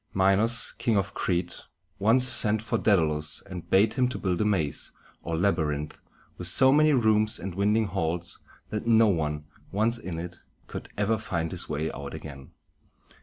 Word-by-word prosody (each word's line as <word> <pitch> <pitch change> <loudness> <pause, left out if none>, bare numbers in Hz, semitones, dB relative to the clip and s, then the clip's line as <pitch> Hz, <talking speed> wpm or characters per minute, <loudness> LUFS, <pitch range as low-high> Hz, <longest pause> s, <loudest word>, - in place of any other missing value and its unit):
Minos, 100 +5 +2
King 115 -3 +1
of 100 0 -1
Crete, 90 -1 -2 0.4
once 115 +6 +4
sent 110 -3 +3
for 110 - -1
Dædalus, 75 -7 +1
and 90 -3 -9
bade 100 +3 +4
him 130 -2 +1
build 95 -8 -2
a - - +1
maze, 85 -9 -1 0.3
or 85 -1 -3
labyrinth, 80 -5 -1 0.4
with 90 - -3
so 130 +9 +6
many 155 +2 +4
rooms 110 -4 +2
and 95 +1 -6
winding 105 +4 +1
halls, 85 -2 -1 0.3
that 105 +1 -4
no 115 -1 +5
one, 75 -6 -1 0.3
once 110 +4 +1
in 90 -6 -6
it, 90 +1 -7 0.3
could - - -8
ever 105 +1 +1
find 85 -6 -3
his 90 -1 -4
way 75 +1 -2
out 70 +1 -7
again. 70 -4 -10
95 Hz, 165 wpm, -27 LUFS, 80-110 Hz, 0.4 s, so